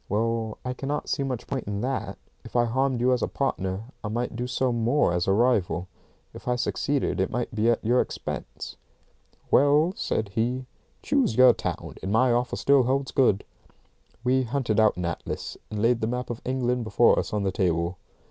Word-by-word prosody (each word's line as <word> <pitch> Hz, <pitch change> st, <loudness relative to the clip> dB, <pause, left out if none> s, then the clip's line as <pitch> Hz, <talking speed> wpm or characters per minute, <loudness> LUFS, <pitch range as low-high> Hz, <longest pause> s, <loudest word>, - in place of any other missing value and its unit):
"Well, 110 Hz, +1 st, -1 dB
I 125 Hz, -, -1 dB
cannot 140 Hz, +3 st, -3 dB
see 145 Hz, -, 0 dB
much 130 Hz, -3 st, -3 dB
point 135 Hz, -, -4 dB
in 100 Hz, 0 st, -2 dB
that. 130 Hz, +2 st, -3 dB, 0.3 s
If -, -, -13 dB
I 120 Hz, -1 st, +4 dB
harmed 130 Hz, +2 st, 0 dB
you 125 Hz, +1 st, +4 dB
as 125 Hz, -, 0 dB
a -, -, +1 dB
partner, 95 Hz, -7 st, -2 dB, 0.2 s
I -, -, -2 dB
might 120 Hz, +2 st, -2 dB
do 125 Hz, +1 st, -3 dB
so 125 Hz, 0 st, 0 dB
more 120 Hz, -2 st, +2 dB
as 90 Hz, +1 st, 0 dB
a -, -, +3 dB
rival. 100 Hz, -5 st, +2 dB, 0.5 s
If -, -, -11 dB
I 125 Hz, -, +2 dB
succeeded 135 Hz, +1 st, -1 dB
it 95 Hz, -, +1 dB
might 120 Hz, 0 st, -3 dB
be 110 Hz, +1 st, +2 dB
at 115 Hz, -2 st, +1 dB
your 120 Hz, +3 st, +4 dB
expense." -, -, -6 dB, 0.7 s
"Well," 145 Hz, +5 st, +4 dB
said 110 Hz, -2 st, -2 dB
he, 120 Hz, +5 st, -1 dB, 0.4 s
"choose 275 Hz, -6 st, +1 dB
your 130 Hz, -1 st, +7 dB
town, -, -, -5 dB
and 95 Hz, -, -3 dB
my 125 Hz, +4 st, +4 dB
offer 120 Hz, +1 st, 0 dB
still 140 Hz, -1 st, +4 dB
holds 135 Hz, +2 st, 0 dB
good." 105 Hz, -7 st, +3 dB, 0.8 s
We 130 Hz, +1 st, +3 dB
hunted 120 Hz, -3 st, 0 dB
out 110 Hz, -3 st, +4 dB
an 90 Hz, -, -2 dB
atlas, 85 Hz, -, -4 dB
and 105 Hz, -1 st, -4 dB
laid 115 Hz, +2 st, +2 dB
the 110 Hz, -, 0 dB
map 125 Hz, +1 st, -3 dB
of 120 Hz, -, -6 dB
England 125 Hz, -1 st, 0 dB
before 110 Hz, +2 st, +4 dB
us -, -, -3 dB
on 105 Hz, -1 st, -1 dB
the 95 Hz, -, 0 dB
table. 85 Hz, -1 st, 0 dB
120 Hz, 195 wpm, -26 LUFS, 105-130 Hz, 0.8 s, your